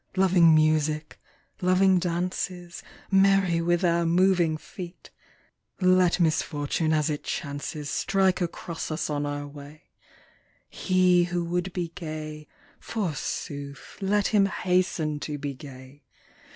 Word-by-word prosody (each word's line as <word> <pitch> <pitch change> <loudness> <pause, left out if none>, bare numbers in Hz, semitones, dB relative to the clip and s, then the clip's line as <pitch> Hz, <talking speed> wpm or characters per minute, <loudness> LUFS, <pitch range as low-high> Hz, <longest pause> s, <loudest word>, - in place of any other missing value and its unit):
Loving 180 -4 +5
music, 155 0 +1 0.4
loving 185 +1 +4
dances. 175 0 -3 0.3
Merry 195 -3 +4
with 175 +2 +1
our 170 0 +2
moving 175 -1 +3
feet! 175 +2 -10 0.7
Let 185 -1 +3
misfortune 155 -1 0
as 155 0 +1
it 145 - -4
chances 145 +1 -5
Strike 190 -2 +1
across 170 -1 -4
us 155 0 -3
on 145 0 -1
our 145 0 -4
way: 145 +2 -13 0.8
He 180 -2 +2
who 175 -1 -2
would 180 +2 -2
be 175 -1 -3
gay, 155 -3 -7 0.3
forsooth, 145 -7 -5
Let 200 +1 +1
him 200 -2 +4
hasten 180 -5 0
to 150 0 -4
be 145 -1 -4
gay. 135 0 -12
170 Hz, 115 wpm, -26 LUFS, 150-185 Hz, 0.8 s, Loving